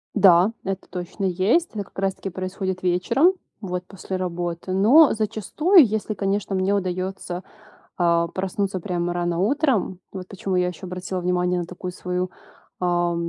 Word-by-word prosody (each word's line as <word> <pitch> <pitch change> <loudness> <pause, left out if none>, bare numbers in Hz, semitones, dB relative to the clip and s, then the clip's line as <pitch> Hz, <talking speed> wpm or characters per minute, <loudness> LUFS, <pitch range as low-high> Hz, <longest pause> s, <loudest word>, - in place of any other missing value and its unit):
Да, 190 -1 +6
это 195 -1 -4
точно 180 +2 -4
есть. 195 - +2
Это 210 -2 -3
как - - -23
раз 195 -1 0
таки 195 - -5
происходит 185 0 -4
вечером, 230 - +3 0.3
вот 180 -3 -3
после 190 -1 -5
работы. 175 0 -3
Но 250 +11 +6
зачастую, 255 - +4
если, 215 0 -2
конечно, 200 0 -1
мне 190 +1 +1
удаётся, 185 -1 -3 0.5
а, 170 -1 +3
проснуться 190 +2 -2
прямо 175 -1 -2
рано 175 -1 -1
утром, 230 - +1
вот 185 -2 -7
почему 190 -1 -3
я 180 0 +2
ещё 180 +1 -6
обратила 185 +1 -4
внимание 180 0 +1
на 175 - -3
такую 180 +1 -7
свою, 180 0 -3 0.5
а, 175 -1 +1
185 Hz, 155 wpm, -23 LUFS, 180-200 Hz, 0.5 s, Да